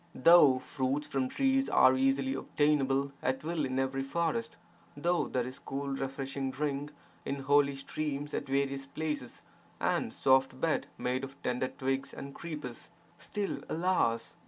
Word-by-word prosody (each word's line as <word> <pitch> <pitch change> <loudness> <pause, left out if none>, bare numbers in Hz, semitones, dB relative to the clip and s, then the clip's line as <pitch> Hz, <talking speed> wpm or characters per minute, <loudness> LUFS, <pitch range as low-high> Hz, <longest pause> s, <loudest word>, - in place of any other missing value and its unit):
Though 150 -2 +7
fruits 130 +3 -2
from 135 -3 -1
trees 270 - +2
are 130 0 +6
easily 135 0 +2
obtainable 140 -1 +1
at 130 +2 -1
will 160 -1 -1
in 130 0 -2
every 135 0 0
forest, 135 -4 -1 0.4
though 175 +4 +1
there 125 -2 -1
is 130 +1 -7
cool 140 +1 -4
refreshing 135 0 -3
drink 145 +1 -2
22 - - -26
VAIRAGYA 145 - -28
SATAKAM 140 - -3
in 135 - -7
holy 140 0 +4
streams 145 +1 -4
at 140 - -3
various 135 0 0
places 150 -4 -4 0.4
and - - 0
soft 130 0 +3
bed 160 +2 0
made 130 +1 -1
of 135 +1 -8
tender 125 +1 0
twigs 135 +1 -3
and 140 0 -7
creepers, 150 -8 -7 0.3
still 205 -2 -3
(alas!) 160 -10 +1
135 Hz, 160 wpm, -31 LUFS, 130-150 Hz, 0.4 s, Though